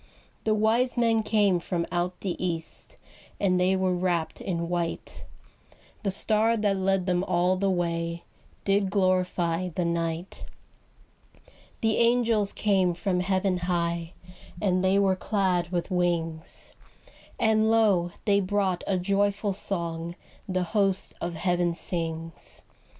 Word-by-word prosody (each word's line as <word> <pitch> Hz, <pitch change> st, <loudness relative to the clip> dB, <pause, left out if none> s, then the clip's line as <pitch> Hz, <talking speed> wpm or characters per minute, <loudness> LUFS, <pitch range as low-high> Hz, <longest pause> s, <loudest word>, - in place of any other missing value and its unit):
The 215 Hz, -1 st, +3 dB
wise 230 Hz, +4 st, +2 dB
men 230 Hz, -2 st, +3 dB
came 205 Hz, -4 st, +2 dB
from 170 Hz, 0 st, -2 dB
out 175 Hz, +1 st, -2 dB
the 190 Hz, -3 st, -1 dB
east, 165 Hz, -3 st, -2 dB, 0.4 s
And 185 Hz, -2 st, +2 dB
they 185 Hz, +1 st, +3 dB
were 185 Hz, -1 st, +1 dB
wrapped 175 Hz, -2 st, -1 dB
in 170 Hz, -2 st, -2 dB
white; 170 Hz, -1 st, -3 dB, 0.8 s
The 200 Hz, -, -1 dB
star 220 Hz, +3 st, +3 dB
that 205 Hz, -2 st, +1 dB
led 190 Hz, -1 st, +1 dB
them 180 Hz, -1 st, +1 dB
all 180 Hz, +1 st, +2 dB
the 195 Hz, +1 st, 0 dB
way 170 Hz, -2 st, -1 dB, 0.4 s
Did 195 Hz, 0 st, +2 dB
glorify 185 Hz, -2 st, +1 dB
the 175 Hz, +1 st, -2 dB
night. 170 Hz, +1 st, -3 dB, 1.4 s
The 220 Hz, -1 st, +2 dB
angels 230 Hz, -3 st, +3 dB
came 190 Hz, -4 st, +1 dB
from 180 Hz, +1 st, -1 dB
heaven 185 Hz, 0 st, +1 dB
high, 170 Hz, -1 st, -1 dB, 0.5 s
And 185 Hz, -3 st, +1 dB
they 190 Hz, +1 st, +3 dB
were 195 Hz, -1 st, +3 dB
clad 185 Hz, -3 st, 0 dB
with 175 Hz, +1 st, -2 dB
wings; 170 Hz, -3 st, 0 dB, 0.7 s
And 220 Hz, 0 st, +3 dB
lo, 205 Hz, -6 st, +3 dB, 0.2 s
they 200 Hz, -1 st, +4 dB
brought 190 Hz, -2 st, 0 dB
a 195 Hz, -, +1 dB
joyful 200 Hz, +2 st, 0 dB
song 170 Hz, -3 st, -2 dB, 0.3 s
The 185 Hz, -1 st, 0 dB
host 195 Hz, +1 st, +1 dB
of 170 Hz, 0 st, -3 dB
heaven 175 Hz, 0 st, 0 dB
sings. 165 Hz, -2 st, -3 dB
185 Hz, 130 wpm, -27 LUFS, 175-200 Hz, 1.4 s, they